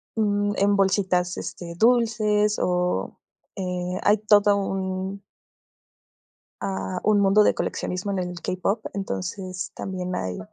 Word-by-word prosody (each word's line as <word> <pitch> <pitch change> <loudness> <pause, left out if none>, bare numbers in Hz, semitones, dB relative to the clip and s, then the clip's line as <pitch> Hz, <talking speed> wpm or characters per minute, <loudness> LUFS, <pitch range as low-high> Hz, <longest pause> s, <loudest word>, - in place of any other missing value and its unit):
mm, 205 -2 +1
en 200 +1 +3
bolsitas, 190 -2 +1
este, 170 -1 -6
dulces 215 -2 +3
o, 180 0 -1 0.4
eh, 180 -1 -3
hay 210 +1 +5
todo 205 -1 +4
un 190 0 -3 1.4
ah, 95 -1 -3
un 210 -1 +4
mundo 200 +2 +5
de - - +4
coleccionismo 180 +3 -3
en 195 - -1
el 180 -1 -4
k-pop, 185 +6 -1
entonces 185 - -4
también 185 -1 -4
hay 95 -1 -3
195 Hz, 120 wpm, -24 LUFS, 180-205 Hz, 1.4 s, hay